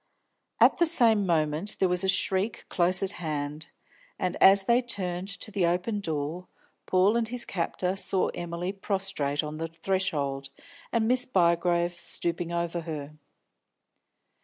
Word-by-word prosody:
At - - +5
the 340 - +5
same 225 - +3
moment 160 +4 0
there 190 - +2
was 180 0 +1
a 190 - +1
shriek 195 +3 0
close 180 +2 +2
at 195 - -2
hand, 150 -1 -4 0.5
and, 185 -2 -2
as 195 0 +8
they 235 +5 +3
turned 190 -6 -4
to 200 +2 -2
the 195 -4 +1
open 180 +5 -1
door, 160 0 -4 0.4
Paul 190 +4 +3
and 235 -1 +1
his 240 +1 -3
captor 180 +1 -2
saw 190 -1 +1
Emily 175 +1 -4
prostrate 195 -8 -1
on 150 0 -5
the 165 +1 -3
threshold, 160 -6 -2 0.4
and 225 -2 +1
Miss 250 +1 +3
Bygrave 175 -4 +2
stooping 170 0 -4
over 170 0 -2
her. 155 -3 -6
180 Hz, 145 wpm, -27 LUFS, 165-195 Hz, 0.5 s, as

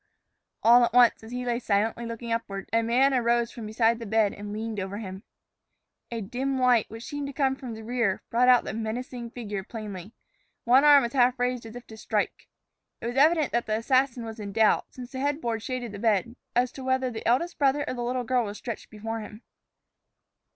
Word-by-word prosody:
All 240 +2 +7
at 235 - +1
once, 245 -1 +5
as 220 - -10
he 250 0 -4
lay 240 -1 0
silently 225 +1 0
looking 230 0 -6
upward, 200 -4 -3
a 230 - +4
man 250 +4 +3
arose 235 -1 +2
from 230 -3 -8
beside 225 +1 +2
the 230 - -7
bed 215 -1 +2
and 205 0 -8
leaned 215 0 -4
over 195 +1 -4
him. 190 -3 -7 0.9
A 230 -1 -4
dim 260 +6 -2
light, 250 -3 +3
which 225 +1 -9
seemed 290 +2 -5
to 280 - -7
come 265 -1 +1
from 250 -4 -7
the 220 - -9
rear, 230 -4 -1
brought 245 +2 +3
out 250 -1 +6
the - - -5
menacing 235 +2 -4
figure 210 -5 -5
plainly. 205 -3 -8 0.5
One 255 +4 +5
arm 290 -2 +7
was 235 - -3
half 255 -1 +3
raised 245 -1 -1
as 225 - -11
if 245 0 -9
to 220 - -12
strike. 215 -1 -2 0.5
It - - -8
was 240 +1 -3
evident 305 +2 +4
that 235 -1 -1
the 215 0 +1
assassin 255 0 +1
was 225 0 -8
in 200 -1 -6
doubt, 220 0 +3
since 250 -1 -10
the 260 - -5
headboard 265 -5 -1
shaded 245 -1 -4
the 205 - -8
bed, 220 +1 +1 0.2
as 245 +1 +2
to 265 - -9
whether 260 -1 0
the 220 - -5
eldest 265 +9 +1
brother 285 0 +2
or - - -2
the 245 - -5
little 250 +1 -1
girl 245 0 +1
was 205 0 -6
stretched 230 -3 -7
before 225 +1 -5
him. 215 +1 -10
235 Hz, 215 wpm, -27 LUFS, 220-255 Hz, 0.9 s, All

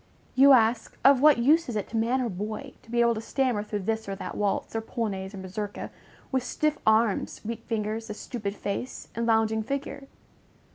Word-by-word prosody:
You 275 +1 +7
ask, 230 -1 +2
Of 270 -1 +7
what 300 -2 +7
use 295 +6 +3
is 235 - -4
it 210 - -2
to - - -7
man 235 +4 +1
or 240 - -1
boy 215 +7 -5
to - - -22
be 240 0 +2
able 235 0 +4
to 220 - -4
stammer 250 -2 0
through 210 -1 -4
this 220 0 -2
or 195 - -2
that - - -6
waltz, 205 +2 -1
or 225 - 0
polonaise 205 -4 -4
or - - -8
mazurka, 195 +2 -5 0.4
with 260 -1 +1
stiff 305 +4 -1
arms, 220 -1 +2
weak 230 0 -5
fingers, 220 0 -2
a 210 - -4
stupid 210 -3 -5
face, 205 +6 -5
and 230 0 -2
lounging 220 -1 +2
figure? 275 +3 -4
225 Hz, 200 wpm, -27 LUFS, 210-255 Hz, 0.4 s, You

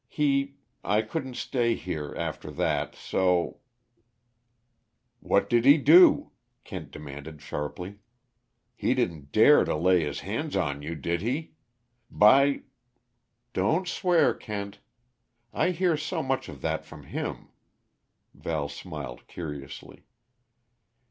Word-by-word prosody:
He 140 -2 0 0.3
I 105 +2 +2
couldn't 130 +2 -5
stay 120 -3 0
here, 75 -5 -5
after 80 -2 -4
that, - - -1
so 90 -2 0 0.7
" 120 0 -48
"What 100 - +3
did 120 -1 +3
he 140 +4 +8
do?" 160 +5 +6 0.3
Kent - - -8
demanded 75 +1 -9
sharply. 90 +7 -6 0.8
"He - - 0
didn't 75 -5 -2
dare - - +6
to - - -1
lay 90 +2 +3
his 75 -2 -4
hands - - -3
on 70 0 -1
you 80 +3 -5
did 85 +3 -2
he? 135 +9 -3 0.6
By 135 +6 +5 0.4
" 120 0 -50
"Don't 160 - +1
swear, 175 - +3
Kent 100 -3 -6 0.7
I - - +2
hear 180 -1 +1
so 155 +2 -3
much 135 -6 -2
of 70 -4 -10
that - - -2
from - - -13
him!" - - -5 0.8
Val 75 -3 -3
smiled 70 -3 -8
curiously. 75 -5 -8
105 Hz, 120 wpm, -27 LUFS, -, 0.8 s, he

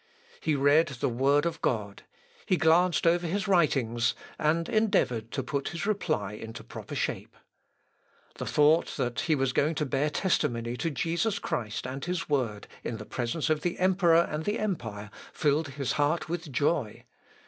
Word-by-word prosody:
He 155 - 0
read 145 +4 +4
the 140 -5 -2
Word 140 +5 +2
of 165 -1 -2
God; 105 -4 -1 0.5
he 185 - +3
glanced 170 +2 +3
over 170 +1 +3
his 200 +5 -1
writings, 135 - +2 0.2
and 165 +2 +1
endeavoured 195 - +1
to 135 - -1
put 140 +2 -2
his 175 +2 -4
reply 155 - -1
into 110 +1 -8
proper - - -8
shape. - - -3 1.0
The - - -4
thought 150 +3 +3
that 120 -3 -1
he 160 +4 +2
was 135 -2 0
going 155 +5 +2
to 150 - 0
bear 140 +2 0
testimony 120 -8 0
to 165 - -1
Jesus 170 - -1
Christ 110 - -3
and 135 +2 -5
his 180 0 -2
Word, 120 -8 -1 0.2
in 115 - -3
presence 120 +8 -3
of 155 -1 +1
the 175 +2 -2
emperor 175 -2 +4
and 155 +1 -3
the 205 +2 0
empire, 115 - -4 0.2
filled 150 +1 +1
his 140 -2 -3
heart 150 +3 +1
with 165 -2 -4
joy. 135 -3 0
150 Hz, 165 wpm, -28 LUFS, 125-170 Hz, 1.0 s, read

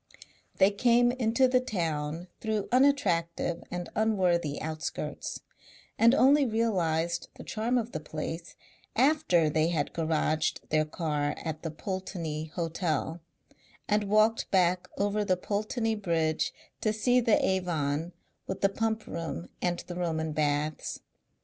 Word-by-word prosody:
They 195 +2 +5
came 240 +3 +4
into 250 +1 +2
the 255 0 +3
town 165 -8 -2
through 215 -2 -2
unattractive 180 -11 +2
and 175 0 -4
unworthy 180 -8 +1
outskirts, 155 0 -4 0.5
and 230 +3 +5
only 280 +3 +5
realized 175 -8 0
the - - -10
charm 230 +3 -1
of 235 0 -2
the - - -3
place 160 +2 -6 0.4
after 260 - +3
they 155 +1 +2
had 160 -4 -1
garaged 155 -1 0
their 155 0 +2
car 150 -2 -1
at 160 -1 -5
the 165 - -3
Pulteney 165 -2 -4
Hotel 165 0 -2 0.7
and 210 0 +2
walked 215 +2 +3
back 180 -1 +2
over 205 +1 +1
the 185 -2 +1
Pulteney 215 +4 -1
Bridge 165 -6 0 0.3
to 215 - +2
see 245 +3 +3
the 230 -3 +4
Avon 165 -4 0 0.4
with 190 - -4
the 195 - +4
Pump 220 +1 -1
Room 160 - -5
and 175 -1 0
the 175 - -6
Roman 160 -3 -1
Baths. 150 0 -1
180 Hz, 130 wpm, -29 LUFS, 160-220 Hz, 0.7 s, They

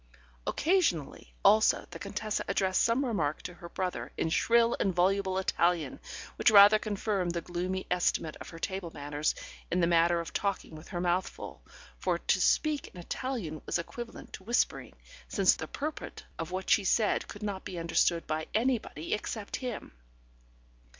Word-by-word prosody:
Occasionally, 190 - 0
also, 215 +1 +5
the - - -8
Contessa 210 +1 -3
addressed 190 -1 +2
some 235 +4 +2
remark 160 - -1
to 180 - -6
her 170 0 -11
brother 185 0 -3
in - - 0
shrill 235 +5 +4
and 190 -3 +1
voluble 190 +1 +2
Italian, 175 -5 +1 0.4
which - - +5
rather 205 0 +8
confirmed 200 -4 -1
the 170 - -1
gloomy 180 +2 -3
estimate 175 -3 +1
of - - -9
her 165 - -10
table 190 0 -3
manners 145 +1 -1 0.3
in 180 - +1
the 170 - +4
matter 170 0 +4
of 170 - -6
talking 200 -4 -2
with 155 +2 -11
her 175 - -4
mouth 175 +1 +1
full, - - -10 0.4
for - - +1
to - - +1
speak 305 -2 +2
in 180 - -12
Italian 175 - -4
was - - +1
equivalent 235 +7 -7
to - - -8
whispering, 235 +4 0 0.3
since - - +4
the - - -6
purport 305 +2 -5 0.2
of 165 0 -3
what 185 +1 -4
she 205 - +5
said 210 +2 +2
could 205 - -9
not 200 -2 -3
be 180 - -6
understood 165 0 +1
by 155 0 -2
anybody 220 - 0
except 210 0 -3
him. 250 -4 -5
190 Hz, 165 wpm, -30 LUFS, 170-215 Hz, 0.4 s, rather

